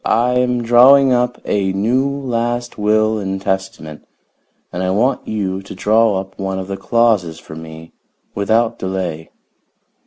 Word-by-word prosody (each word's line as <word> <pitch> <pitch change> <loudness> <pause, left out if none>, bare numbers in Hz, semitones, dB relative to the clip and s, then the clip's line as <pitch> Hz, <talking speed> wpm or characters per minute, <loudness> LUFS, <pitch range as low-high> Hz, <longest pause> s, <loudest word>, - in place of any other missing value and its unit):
I 120 +3 +2
am 125 -1 0
drawing 130 +3 +6
up 125 0 0
a 95 -2 0
new 120 +8 +1
last 120 -3 -3
will 110 +1 +2
and 95 -1 -3
testament, 95 -6 -4 0.7
and 90 - -3
I 95 - -1
want 115 +8 0
you 95 -3 -3
to 95 - -10
draw 110 0 +2
up 95 +1 -10
one 95 -1 -3
of 95 0 -5
the 100 - -4
clauses 105 -8 +1
for 80 - -12
me 80 0 -11 0.4
without 110 +3 0
delay." 90 -4 -4
105 Hz, 150 wpm, -17 LUFS, 95-120 Hz, 0.7 s, drawing